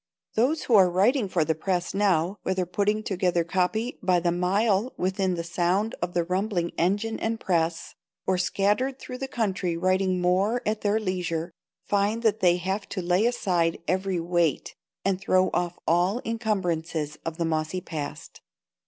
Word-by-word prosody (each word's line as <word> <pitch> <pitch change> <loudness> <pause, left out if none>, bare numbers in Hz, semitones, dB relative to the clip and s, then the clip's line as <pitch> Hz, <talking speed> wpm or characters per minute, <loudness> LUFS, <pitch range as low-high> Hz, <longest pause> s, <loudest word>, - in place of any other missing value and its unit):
Those 265 +8 +1
who 245 - -1
are 190 -4 +7
writing 205 +5 +2
for 170 -4 +1
the 160 - +1
press 175 +2 -2
now, 195 -1 +1
whether 185 -1 -1
putting 210 +4 0
together 180 -4 +1
copy 190 +8 -1
by 185 -2 +3
the 175 0 +1
mile 195 +6 +1
within 190 0 0
the 170 - -3
sound 180 +5 0
of 175 +1 -3
the 175 - +2
rumbling 180 0 -1
engine 205 +6 0
and 225 0 -2
press, 165 -2 -1 0.3
or 185 -1 +1
scattered 210 +8 +1
through 255 -1 -8
the 270 - -3
country 190 -8 -1
writing 185 +1 +1
more 190 +7 +1
at 215 0 -1
their 210 +1 +2
leisure, 175 -4 -2 0.3
find 205 +3 0
that 220 -1 +2
they 175 -3 +4
have 190 +3 -3
to 190 - -3
lay 180 +6 +3
aside 180 -9 +1
every 185 0 0
weight 170 -3 0 0.3
and 195 -1 +1
throw 185 -1 +2
off 175 0 -1
all 175 +5 +3
the 240 - -5
incumbrances 175 -9 -2
of 165 -1 -4
the 170 - 0
mossy 160 +2 -1
past. 155 -4 -7
185 Hz, 170 wpm, -26 LUFS, 175-210 Hz, 0.3 s, are